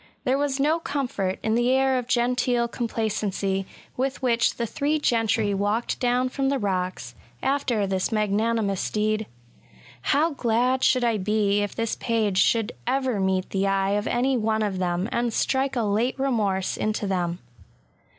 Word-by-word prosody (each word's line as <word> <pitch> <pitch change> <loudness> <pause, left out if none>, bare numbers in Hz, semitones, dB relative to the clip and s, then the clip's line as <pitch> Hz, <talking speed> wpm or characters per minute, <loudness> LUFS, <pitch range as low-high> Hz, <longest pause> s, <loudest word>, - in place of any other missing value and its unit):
There 265 0 +1
was 285 -1 -1
no 305 +4 +2
comfort 245 - -2
in 220 - +1
the 240 +2 +2
air 265 0 +3
of 245 - -6
genteel 245 -1 +1
complacency 210 -5 -2 0.3
with 265 +2 -2
which 235 -3 +2
the 235 - -2
three 290 +7 0
gentry 225 -6 +1
walked 205 +4 -1
down 250 +1 +1
from 270 +1 -1
the 275 - +1
182 205 - -3
BgSATS. 195 - +1
rocks, 180 -10 -4 0.3
after 260 -6 +1
this 190 +1 -1
magnanimous 215 -1 0
deed. 215 0 0 0.7
How 310 - +2
glad 250 0 +1
should 255 -1 +3
I 230 -3 +1
be 205 0 +1
if 205 - -3
this 230 -1 -1
page 215 -5 0
should 225 -1 +2 0.2
ever 260 -4 0
meet 190 -1 0
the 195 0 0
eye 195 0 +1
of 205 +1 0
any 260 +2 +1
one 220 -1 0
of 195 -3 -2
them, 180 +1 -1
and 235 0 0
strike 265 +4 0
a 240 - +1
late 220 +6 0
remorse 215 -8 0
into 215 0 -1
them! 175 -3 -1
225 Hz, 170 wpm, -25 LUFS, 200-255 Hz, 0.7 s, air